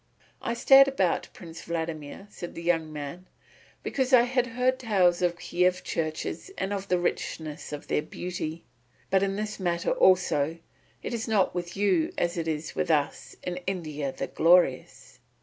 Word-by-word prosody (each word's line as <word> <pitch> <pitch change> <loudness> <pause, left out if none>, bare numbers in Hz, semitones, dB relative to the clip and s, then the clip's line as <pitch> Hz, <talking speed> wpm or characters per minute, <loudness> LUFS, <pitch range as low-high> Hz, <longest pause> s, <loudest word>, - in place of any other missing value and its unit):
"I 235 - -2
stared 270 +3 +7
about, 195 -11 0
Prince 165 -2 -10
Vladimir," 165 +1 -5
said 175 - -8
the 170 - -7
young 165 -2 +1
man, 150 +5 -7 0.6
"because 265 -1 -1
I 240 -2 +8
had 250 0 +1
heard 255 +2 0
tales 185 -7 +2
of 175 -1 +1
Kiev 180 +1 +1
churches 160 - -3
and 195 +1 -2
of 195 -1 -4
the 180 - +2
richness 160 -3 -3
of 145 -1 -6
their - - +1
beauty. 165 0 -5 0.5
But 190 0 +4
in 195 0 0
this 215 +1 -4
matter 175 -2 0
also, 165 -4 +3 0.5
it - - -4
is 230 0 -3
not 210 -4 +2
with 175 +1 -5
you 195 -5 +2
as 175 0 0
it 165 -2 -3
is 155 0 -3
with - - -2
us 150 -3 0
in 180 0 -3
India 155 -7 -3
the - - -4
Glorious. 170 -6 +2
175 Hz, 165 wpm, -27 LUFS, 160-200 Hz, 0.6 s, I